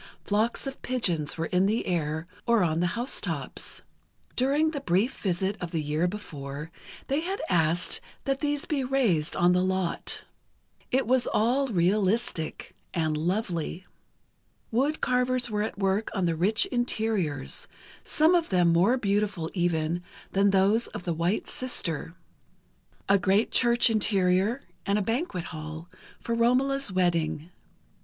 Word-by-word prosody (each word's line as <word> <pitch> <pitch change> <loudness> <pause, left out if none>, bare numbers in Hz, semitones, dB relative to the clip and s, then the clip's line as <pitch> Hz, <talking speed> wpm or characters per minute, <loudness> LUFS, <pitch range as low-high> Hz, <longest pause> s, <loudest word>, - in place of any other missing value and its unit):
Flocks 215 +6 0
of 270 0 -6
pigeons 175 -13 0
were 165 - -1
in 185 +3 +2
the 220 +3 0
air, 160 -2 -1 0.2
or 235 -4 +4
on 160 -1 +1
the 175 - +2
house 245 +3 0
tops. - - -3 0.5
During 285 +5 +2
the 285 -3 -4
brief 215 +5 +1
visit 190 +1 -1
of 175 - -3
the 165 -1 -2
year 155 +4 0
before, 150 -6 -7 0.3
they 275 +2 0
had 380 +5 -3
asked 170 0 +2 0.2
that 275 -1 -1
these 290 -1 -1
be 295 -5 -1
raised 230 - +1
on 175 0 +4
the 180 0 +3
lot. 185 -1 -1 0.6
It 265 +1 +1
was 250 0 +2
all 250 +6 +2
realistic, 195 -2 0 0.2
and 155 -2 0
lovely. 175 +1 -2 0.9
Wood 275 +7 +1
carvers 250 -1 +1
were 210 0 0
at 215 - -3
work 195 +2 0
on 190 -3 +1
the 165 -1 +1
rich 195 +7 +3
interiors, 220 - -1 0.4
some 315 +3 +3
of 345 -2 +2
them 180 -3 +3
more 195 +10 +4
beautiful, 200 -6 -1
even, 170 -2 0 0.3
than 200 +1 +3
those 200 +4 +3
of - - -8
"The 175 - -1
White 170 +6 -1
Sister": 170 - -2 0.9
a 200 0 +4
great 195 +4 +2
church 240 0 +4
interior, 205 +1 +2 0.2
and 200 0 +1
a 210 - 0
banquet 225 - -2
hall, 155 +2 -7 0.3
for 235 - -3
Romola's 255 +2 +2
wedding. 170 -3 0
195 Hz, 145 wpm, -27 LUFS, 170-240 Hz, 0.9 s, or